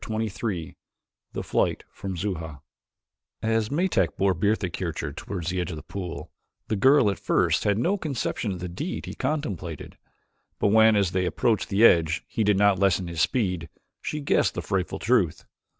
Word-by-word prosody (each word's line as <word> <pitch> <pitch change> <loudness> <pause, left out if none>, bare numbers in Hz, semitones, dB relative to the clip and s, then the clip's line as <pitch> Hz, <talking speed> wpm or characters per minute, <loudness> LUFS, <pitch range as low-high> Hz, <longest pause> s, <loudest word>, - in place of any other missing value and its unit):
Chapter 110 - -4
XXIII 95 -5 -4 0.6
The - - -3
Flight - - 0
from 95 -2 -6
Xuja 80 -6 -4 0.8
As 110 -1 +1
Metak 145 - +1
bore 95 0 +3
Bertha 100 +3 +1
Kircher 80 -5 -4
toward 90 +2 -6
the 90 +2 -1
edge 90 - -3
of 85 - -5
the 75 - -9
pool, 90 -4 -6 0.4
the 110 - +1
girl 130 +1 +5
at 100 - -6
first - - +1
had 105 -1 +2
no 175 - +1
conception 135 - -2
of 90 -2 -6
the 90 - -3
deed 95 - -5
he - - -6
contemplated 95 - -4 0.6
but - - +2
when, 110 +1 +6
as 100 -4 +2
they 90 -1 0
approached 110 +2 0
the 105 +3 +5
edge, 80 -5 +4
he 110 - -1
did 105 -1 +3
not 100 -2 +4
lessen 95 -2 +2
his 85 -1 -2
speed 90 -6 0 0.3
she 150 - -4
guessed 140 - +2
the - - -3
frightful 95 -2 -1
truth. 105 -8 +1
100 Hz, 180 wpm, -26 LUFS, 85-110 Hz, 0.8 s, when